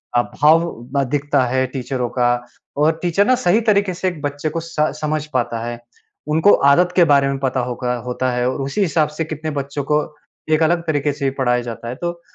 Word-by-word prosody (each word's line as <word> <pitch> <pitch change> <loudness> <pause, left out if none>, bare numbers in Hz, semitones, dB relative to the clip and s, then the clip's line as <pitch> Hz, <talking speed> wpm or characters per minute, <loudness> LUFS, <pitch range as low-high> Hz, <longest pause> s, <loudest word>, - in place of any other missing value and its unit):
अ, 120 - +5
भाव 145 -3 +1
दिखता 145 -1 +1
है 130 +1 +1
टीचरों 125 -2 -3
का 120 -1 +1 0.5
और 160 +2 +2
टीचर 180 +3 +2
ना 255 - +5
सही 205 +6 +4
तरीके 200 -2 +1
से 185 +2 -2
एक 175 -5 -4
बच्चे 145 +1 -3
को 165 - -3
स - - -12 0.3
समझ 155 0 -1
पाता 120 -2 -1
है। 120 0 -5 0.5
उनको 160 +6 +4 0.2
आदत 180 +3 +2
के 180 - +6
बारे 140 -2 +4
में 135 - -2
पता 130 -1 -1
होगा 125 0 -2
होता 125 +1 -1
है। 125 0 0
और 135 - -3
उसी 140 +10 -2
हिसाब 160 -4 +2
से 160 - -1
कितने 155 0 -5
बच्चों 140 0 -4
को 150 0 +3 0.5
एक 160 +1 +3
अलग 170 +2 +2
तरीके 145 -1 +1
से 140 -2 -1
पढ़ाया 125 -1 +2
जाता 120 0 -7
है। 125 - -5
तो 170 0 -4
145 Hz, 210 wpm, -19 LUFS, 130-160 Hz, 0.5 s, के